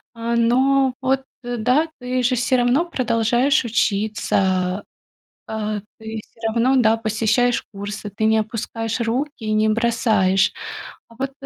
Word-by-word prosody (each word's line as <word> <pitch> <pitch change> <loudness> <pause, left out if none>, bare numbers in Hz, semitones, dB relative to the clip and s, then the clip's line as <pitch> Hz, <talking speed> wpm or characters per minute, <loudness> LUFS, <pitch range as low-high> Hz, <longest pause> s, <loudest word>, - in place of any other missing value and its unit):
э, 230 +1 -2
но 260 +3 +3
вот 265 0 +1 0.2
да, 245 +6 +1
ты 250 0 -2
же 250 +2 +2
всё 255 +2 +1
равно 245 +6 +3
продолжаешь 245 -2 +1
учиться, 200 -4 0 0.6
э. 215 -1 -3 0.2
Ты 220 0 -6
всё - - -27
равно, 235 +4 +2
да, 225 -2 +4
посещаешь 225 +2 +1
курсы. 205 +1 -6
Ты 205 +2 -5
не 220 0 +4
опускаешь 225 +1 -3
руки 250 +3 -2
и 215 - -1
не 215 0 +3
бросаешь. 215 -4 +2 0.6
А 230 - -17
вот 270 0 -2
230 Hz, 135 wpm, -21 LUFS, 215-250 Hz, 0.6 s, да